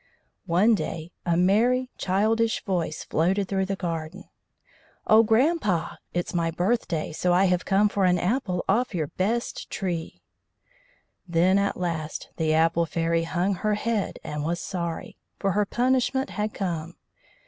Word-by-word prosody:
One 190 +7 +4
day 170 -5 -3 0.2
a 170 -1 +2
merry, 240 +8 +3
childish 220 +4 +1
voice 175 -5 -2
floated 190 +5 +1
through 190 -1 -1
the 195 - -1
garden: 170 0 -4 0.8
"Oh, 215 +1 +7
grandpa! 225 - +1
it's 175 0 -3
my 170 -1 +1
birthday, 175 -2 -1
so 175 +3 +1
I 185 +2 +4
have 180 -1 +1
come 200 +2 +3
for 200 -2 0
an 180 0 +4
apple 185 -1 -1
off 225 +1 +1
your 155 -4 -1
best 225 +6 -2
tree." 175 -5 -4 1.0
Then 180 +3 +3
at 200 0 0
last 165 -3 -3
the 160 -1 +1
Apple 165 +1 +3
Fairy 165 0 0
hung 180 +3 0
her 210 +3 0
head, 220 -1 -1
and 150 0 -4
was 170 +3 -1
sorry, 170 -3 -5 0.2
for 195 - 0
her 205 +1 +1
punishment 260 +3 +1
had 210 0 -2
come. 170 -3 -3
185 Hz, 150 wpm, -25 LUFS, 170-210 Hz, 1.0 s, Oh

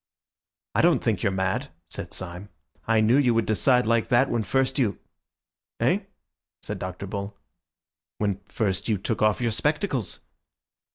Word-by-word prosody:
"I - - +3
don't - - +4
think - - +1
you're 100 - +2
mad," 95 0 -1 0.2
said - - -7
Syme. 95 +2 -6 0.4
"I 110 -1 +4
knew 115 +5 +4
you 125 -5 +3
would 115 -1 +2
decide 125 +3 +3
like 115 0 +2
that 125 +3 +4
when 120 - +1
first 135 +7 0
you—" 105 -8 +1 0.8
"Eh?" - - +3 0.6
said - - -5
Dr. 95 +1 -5
Bull. 100 +1 -5 0.8
"When 100 -2 -1
first 100 -1 -1
you 105 - +2
took 105 +4 -3
off 110 +2 +3
your 120 -1 +1
spectacles." 145 - -1
110 Hz, 155 wpm, -26 LUFS, 100-120 Hz, 0.8 s, don't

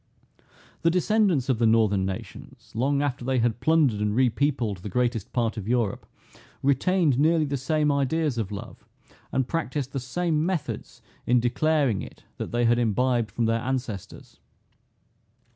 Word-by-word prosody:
The 165 - +3
descendants 180 - +2
of 130 -4 +1
the 115 - +4
northern 105 -4 +3
nations, 95 -1 -8
long 140 +5 +1
after 130 -3 -2
they 130 +1 0
had 120 -1 +1
plundered 150 -9 +3
and 105 0 0
repeopled 125 -3 +1
the 105 - -7
greatest 120 0 -1
part 115 -2 -1
of 105 -2 -5
Europe, 120 -4 -1 0.6
retained 140 +1 +2
nearly 160 +1 +3
the 140 -1 -2
same 150 +3 +1
ideas 140 -1 0
of 105 -3 -3
love, 100 - -8 0.5
and 130 -2 0
practised 145 -4 -2
the 135 - -1
same 155 +5 -1
methods 155 - -4 0.2
in 125 +1 +4
declaring 130 -1 +1
it, - - -11
that - - -5
they 120 0 +1
had 120 +1 +3
imbibed 120 0 +1
from 120 - -1
their 115 0 +1
ancestors. 120 -6 -5
125 Hz, 155 wpm, -25 LUFS, 115-150 Hz, 0.6 s, the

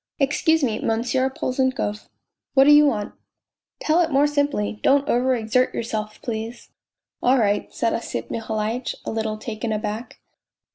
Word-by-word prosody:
" - - -56
Excuse 320 +2 +2
me, 225 -4 0
Monsieur 245 +4 0
Polzunkov." 260 -5 -2 0.2
" - - -65
What 270 - +7
do 290 - +6
you 295 0 +7
want? 210 -7 -2 0.2
" - - -63
" - - -68
Tell 320 +3 +3
it 330 - +1
more 280 0 +3
simply; 285 -8 0
don't 280 +1 +3
over 255 +2 +2
exert 235 +2 +1
yourself, 215 -2 -4
please! 225 0 -5 0.2
" - - -67
" - - -60
All 255 +2 +4
right," 205 -3 +1
said 230 -1 0
Osip 115 - -4
Mihalitch, 225 +2 -2
a - - -3
little 220 -1 -2
taken 220 +1 -4
aback. 215 +2 -4
235 Hz, 180 wpm, -23 LUFS, 215-270 Hz, 0.2 s, What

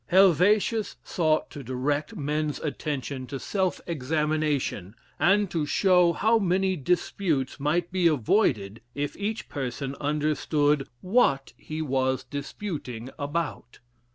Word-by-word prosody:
Heivetius 195 +4 +4
sought 155 -3 0
to 145 - -7
direct 145 - -2
men's 150 -2 -1
attention 140 -3 -3
to 140 - -4
self 190 +2 -1
examination, 150 - -1 0.2
and 195 +6 +4
to 155 -3 -1
show 180 0 +4
how 225 +4 +3
many 190 0 +1
disputes 160 -3 -1
might 165 +5 0
be 180 -2 +3
avoided 115 - +1
if 145 0 -2
each 210 +3 -3
person 135 -1 -4
understood 150 -1 +1
what 180 - +2
he 155 +1 -5
was 130 -2 0
disputing 140 - -6
about. 145 -4 -3
150 Hz, 115 wpm, -26 LUFS, 140-180 Hz, 0.2 s, Heivetius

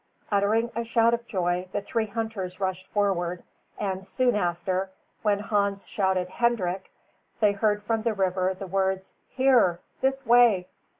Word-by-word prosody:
Uttering 215 +4 +2
a 235 - -1
shout 230 0 +3
of 235 0 -2
joy, 180 -3 -1
the - - 0
three 225 +1 -1
hunters 205 -4 -4
rushed 185 -1 -2
forward, 180 -4 0 0.3
and 190 -2 -3
soon 245 +5 +1
after, 185 0 -1 0.3
when 205 -2 +2
Hans 200 -1 -1
shouted 190 -2 0
"Hendrik," 190 -3 -1 0.5
they 210 -2 +4
heard 205 +1 0
from 225 +1 0
the 225 -1 0
river 185 -1 0
the 195 - -7
words, 190 0 -1 0.2
"Here, 250 -10 +3 0.2
this 270 0 0
way." 235 -6 +5
200 Hz, 145 wpm, -26 LUFS, 185-225 Hz, 0.5 s, way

